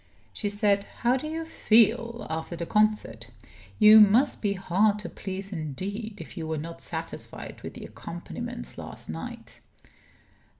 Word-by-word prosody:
She 205 - -2
said: 205 -1 +2 0.2
"How 245 +1 +4
do 265 +4 -3
you 325 +1 -3
feel 235 -4 +3
after 160 +2 -4
the 170 0 -4
concert? 210 - +1 0.5
You 215 +1 +9
must 225 +7 +5
be 205 -2 +1
hard 200 +2 +2
to 210 - -6
please 195 +1 -6
indeed 195 - -4
if - - -9
you 165 -4 -4
were 160 0 -2
not 165 +3 -7
satisfied - - -7
with - - -8
the - - -8
accompaniments - - -7
last - - -8
night." 80 +1 -8
205 Hz, 145 wpm, -27 LUFS, 170-220 Hz, 0.5 s, You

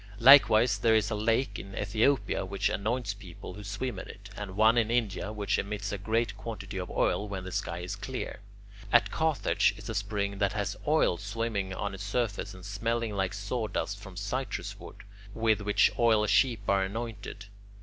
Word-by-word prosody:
Likewise 120 -4 +7
there 110 +1 +4
is 110 0 +2
a - - 0
lake 115 +5 0
in 100 0 -9
Ethiopia 110 +7 +1
which 95 +1 -1
anoints 110 +1 -1
people 95 -3 -10
who 105 - -9
swim 100 +6 -4
in - - -8
it, - - -12
and 100 -3 -6
one 110 +2 +6
in 115 -2 +2
India 110 -4 0
which 105 -2 0
emits 100 0 -3
a 100 - -2
great 110 +1 0
quantity 105 -3 -6
of 90 - -5
oil 105 - +1
when 95 -2 -4
the 95 - -7
sky 95 -3 -2
is 90 - -4
clear. - - -5 0.5
At - - +5
Carthage 160 -2 +2
is - - -9
a - - -2
spring 100 -1 -2
that 100 0 +1
has 105 -2 -2
oil 150 - +3
swimming 100 -1 -2
on 100 0 -3
its 95 +1 -6
surface 105 -1 -2
and 95 -1 -11
smelling 115 +2 -1
like 95 -1 -1
sawdust 100 -1 -3
from 95 -3 -11
citrus 125 +7 -3
wood, - - -11 0.3
with 110 -2 +2
which 105 0 +3
oil 110 -2 +4
sheep 115 0 +3
are 100 0 +3
anointed. 105 0 -5
105 Hz, 185 wpm, -29 LUFS, 100-115 Hz, 0.5 s, Likewise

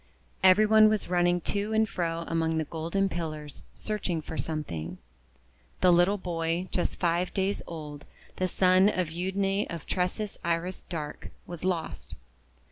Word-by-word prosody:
Every 190 +3 +7
one 215 0 +7
was 215 -4 -1
running 175 0 +2
to 205 +5 -2
and 220 0 +3
fro 170 -4 -2
among 165 -1 0
the 160 - +1
golden 165 +6 -1
pillars, 155 -5 -5
searching 200 -6 -2
for 160 +1 -7
something. 150 - -4 0.8
The 180 - +6
little 175 +4 +4
boy, 170 0 -2
just 180 - -1
five 175 +1 +1
days 195 +1 0
old, 150 -3 -7 0.3
the 185 - +1
son 185 +2 +4
of 180 -5 -1
Euadne 195 +3 0
of 170 -3 -6
Tresses 190 +3 -2
Iris 170 +2 -1
Dark, 155 -4 -5 0.2
was 175 -2 -8
lost. 180 -3 -3
175 Hz, 145 wpm, -28 LUFS, 165-195 Hz, 0.8 s, Every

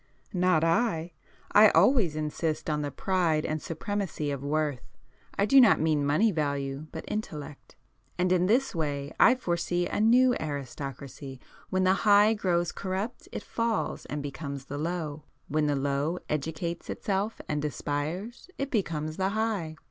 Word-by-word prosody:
"Not 180 -3 +3
I! 165 -1 +1 0.4
I 210 0 +8
always 195 - +4
insist 155 +1 -2
on 150 0 0
the 145 - -2
pride 165 -1 0
and 155 0 -2
supremacy 165 -3 -3
of 140 -2 -4
worth,—I 145 +3 -3
do 270 +5 +7
not 230 -5 +6
mean 155 -2 +2
money 195 +10 +3
value, 140 -2 -2
but 160 - -7
intellect. 155 -9 -6 0.4
And 180 0 +1
in 180 0 +3
this 250 +6 +2
way 145 -3 -2
I - - +7
foresee 175 -5 -1
a - - -2
new 245 +3 +5
aristocracy. 140 -2 -6 0.3
When 185 0 +1
the 185 0 +4
High 210 +1 +6
grows 175 -5 0
corrupt, 195 +5 -4
it - - -5
falls 230 -2 -2
and 145 0 -4
becomes 140 -1 -6
the 145 +1 -5
Low;—when 155 -2 -3
the 145 - +1
Low 140 +4 -1
educates 160 +3 -3
itself 200 +2 -2
and 150 -1 -2
aspires, 150 - -4
it 275 0 -3
becomes 155 - -2
the 190 0 +1
High. 205 -7 -2
165 Hz, 150 wpm, -28 LUFS, 145-200 Hz, 0.4 s, I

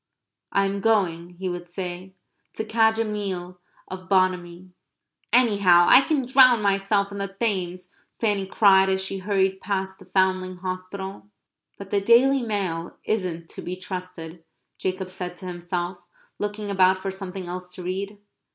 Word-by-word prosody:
"I 195 - +2
am 195 +1 -2
going," 180 -5 +1
he 190 +1 -4
would 175 -1 -5
say, 180 +1 -6 0.4
"to 220 - -3
cadge 220 0 +3
a 225 - +1
meal 185 -4 -4 0.3
of 185 0 -9
Bonamy." 185 -1 0 0.6
"Anyhow, 200 -8 +5
I 255 - +8
can 280 -2 0
drown 255 -2 +6
myself 200 0 +1
in 200 - -6
the 200 - -2
Thames," 185 -3 -3 0.3
Fanny 205 -4 0
cried, 195 -1 +5
as 190 0 +1
she 190 0 -3
hurried 190 -1 0
past 190 -1 -3
the 190 - -14
Foundling 185 0 +1
Hospital. 190 +2 -6 0.5
"But 200 -1 -10
the 200 - +2
Daily 255 +6 +5
Mail 190 -7 -3
isn't 180 -6 -2
to - - -8
be 180 - -5
trusted," 180 -3 -7 0.4
Jacob 185 0 -3
said 180 -1 -6
to 185 - -11
himself, 175 0 -4 0.4
looking 205 0 -3
about 190 -1 +4
for 195 +1 -4
something 190 -1 -6
else 180 +1 -7
to 180 - -8
read. 195 +3 -4
190 Hz, 155 wpm, -24 LUFS, 180-200 Hz, 0.6 s, I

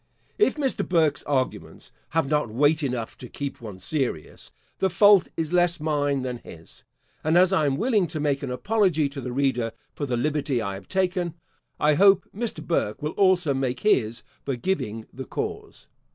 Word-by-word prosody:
If 420 - +4
Mr. 280 -4 -1
Burke's 160 -6 +2
arguments 135 -3 -3 0.2
have 165 -3 0
not 150 -4 +1
weight 145 +7 +2
enough 125 -5 -3
to 125 - -9
keep 140 -3 -6
one 105 -5 -8
serious, 125 - -3 0.3
the 190 - +2
fault 200 +1 +6
is 160 +1 -2
less 175 -1 +3
mine 145 -3 0
than 125 -2 -4
his; 85 -6 -14 0.4
and 160 +2 +3
as 185 +1 +5
I 155 -5 +3
am 135 -1 0
willing 215 -5 +2
to 160 -1 -5
make 145 -2 0
an 140 - -4
apology 180 - +1
to 140 0 -7
the 125 - -5
reader 125 -3 0 0.2
for 145 - -4
the 125 -2 -1
liberty 145 -1 0
I 100 -3 -3
have 95 -1 -9
taken, 180 -3 -1 0.4
I 150 0 +4
hope 195 +3 +5
Mr. 235 +1 -4
Burke 125 -8 -1
will 150 - -1
also 185 -6 +3
make 130 -2 -2
his 115 - +1 0.2
for 135 - -2
giving 115 - -2
the 130 0 -7
cause. - - -5
150 Hz, 180 wpm, -25 LUFS, 130-175 Hz, 0.4 s, fault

